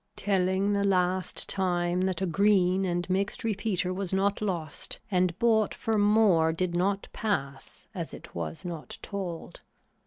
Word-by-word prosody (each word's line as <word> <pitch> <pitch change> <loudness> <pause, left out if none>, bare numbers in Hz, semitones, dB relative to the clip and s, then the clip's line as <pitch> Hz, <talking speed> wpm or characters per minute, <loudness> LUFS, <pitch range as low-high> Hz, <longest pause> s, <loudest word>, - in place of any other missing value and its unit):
Telling 190 0 +1
the 200 0 +1
last 185 -1 +1
time 180 -2 +1
that 185 -1 -1
a - - +2
green 190 0 +3
and 175 -1 -1
mixed 195 +4 -1
repeater 200 -4 -1
was 190 -1 -3
not 200 +2 +1
lost 170 -7 -3
and 180 -2 +1
bought 220 -2 +2
for 225 - -1
more 205 -6 +4
did 175 +2 -1
not 195 +3 0
pass 140 -11 -3
as 170 -5 -5
it 165 - -11
was 165 - -5
not 165 -7 -6
told. 185 -5 -6
185 Hz, 150 wpm, -28 LUFS, 175-200 Hz, -, more